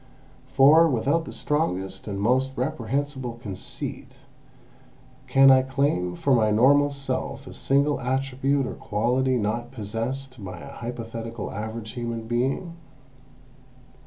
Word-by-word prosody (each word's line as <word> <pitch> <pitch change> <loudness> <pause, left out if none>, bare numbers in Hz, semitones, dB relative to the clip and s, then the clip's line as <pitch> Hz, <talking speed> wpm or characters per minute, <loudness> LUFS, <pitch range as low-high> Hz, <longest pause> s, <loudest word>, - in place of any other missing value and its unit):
For, 155 +5 +6
without 145 +6 +1
the - - -7
strongest 95 - -2
and 100 -2 -3
most 130 +5 +2
reprehensible 130 -1 -2
conceit, 105 -5 -7 1.1
can 135 0 +7
I 130 0 +6
claim 130 -10 0
for 135 +9 +1
my 110 -3 +4
normal 140 +7 +5
self 140 -1 -4
a - - -9
single 140 +2 +1
attribute 135 +1 0
or 125 - -4
quality 125 +5 0
not 120 +2 -2
possessed 125 +2 -5
by 90 -2 -7
an - - -10
hypothetical 115 -1 -6
average 110 +1 -5
human 115 -2 -4
being? 135 +9 -1
125 Hz, 120 wpm, -25 LUFS, 115-135 Hz, 1.1 s, can